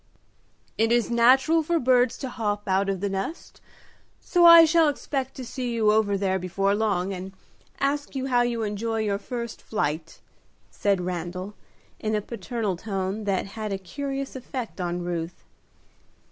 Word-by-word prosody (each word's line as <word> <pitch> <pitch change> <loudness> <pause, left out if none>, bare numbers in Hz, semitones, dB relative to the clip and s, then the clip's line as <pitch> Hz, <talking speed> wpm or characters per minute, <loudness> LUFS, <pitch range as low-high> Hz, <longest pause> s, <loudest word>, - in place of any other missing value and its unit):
"It 225 +1 +3
is 240 0 +2
natural 260 +7 +5
for 335 +2 0
birds 250 -3 +3
to 265 - -5
hop 205 -3 -3
out 195 +1 +1
of 190 -2 -2
the 200 - 0
nest, 195 - -5 0.6
so 350 -1 +3
I 335 -1 +10
shall 325 -1 +4
expect 270 -2 -3
to 260 - -7
see 245 -1 -4
you 215 -2 +3
over 210 -2 +2
there 190 -1 0
before 195 +2 0
long, 200 -3 0
and 190 +1 -7 0.5
ask 285 +1 -1
you 265 -1 -2
how 245 -2 +3
you 240 -2 0
enjoy 220 +2 -2
your 200 -2 -1
first 235 -1 -6
flight," 160 -6 -3 0.5
said 200 -3 0
Randal, 180 +2 -4 0.5
in 215 0 -1
a 210 - 0
paternal 225 -2 -3
tone 195 +1 -3
that 195 -2 0
had 215 -2 -4
a 195 - -1
curious 275 +8 -5
effect 250 -5 -6
on 175 0 -2
Ruth. 175 -1 -4
220 Hz, 160 wpm, -25 LUFS, 195-255 Hz, 0.6 s, I